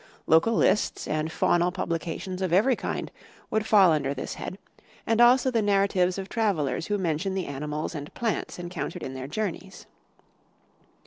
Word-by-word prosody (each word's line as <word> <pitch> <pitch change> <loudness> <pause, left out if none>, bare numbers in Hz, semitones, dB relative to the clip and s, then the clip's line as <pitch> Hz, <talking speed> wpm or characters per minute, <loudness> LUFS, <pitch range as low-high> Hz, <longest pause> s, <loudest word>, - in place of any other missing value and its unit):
Local 165 +9 +4
lists 210 - +1
and 155 +1 -1
faunal 175 +2 +2
publications 175 +1 -4
of 185 -3 -1
every 220 +9 +4
kind - - -4 0.4
would 220 0 0
fall 195 -5 +6
under 140 -3 0
this 130 - -5
head, 185 - -6 0.5
and 225 +1 +2
also 255 +2 +5
the 230 -2 +2
narratives 195 -3 +2
of 190 -1 -5
travelers 165 - -1
who 205 - 0
mention 190 +1 -1
the 190 - -2
animals 150 +3 -4
and 145 -2 -7
plants 225 -6 -2
encountered 175 -4 -5
in 130 - -5
their 130 0 -6
journeys. 190 +2 -5
180 Hz, 155 wpm, -26 LUFS, 155-205 Hz, 0.5 s, fall